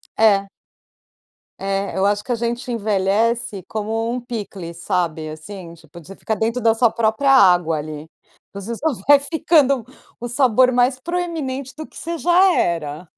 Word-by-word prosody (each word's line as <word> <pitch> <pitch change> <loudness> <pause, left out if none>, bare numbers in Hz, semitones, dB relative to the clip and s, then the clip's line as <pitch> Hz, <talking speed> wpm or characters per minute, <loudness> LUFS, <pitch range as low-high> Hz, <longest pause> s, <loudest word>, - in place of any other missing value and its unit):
É. 200 -3 +3 1.1
É, 195 0 -2
eu 190 - +2
acho 205 +1 +1
que - - -6
a 240 - +2
gente 240 +2 -3
envelhece 215 0 0
como 225 +2 -2
um 250 0 -3
picles, 200 -8 -7
sabe, 165 -3 -2
assim. 170 +2 -9
Tipo, 165 0 -15
de 180 +5 -12
ficar 220 - -3
dentro 230 +4 -1
da 225 -1 +3
sua 230 -1 +3
própria 230 +5 +1
água 180 -10 +5
ali, 150 0 -7 0.5
você 200 +4 -5
só 290 - -9 0.2
vai 290 0 +7
ficando 285 -4 +2 0.4
o 240 - -5
sabor 255 0 +3
mais 250 +1 +2
proeminente 310 -6 -4
do 310 0 -8
que - - -16
você 335 0 -4
já 360 +3 +4
era. 160 - -2
225 Hz, 160 wpm, -20 LUFS, 190-255 Hz, 1.1 s, vai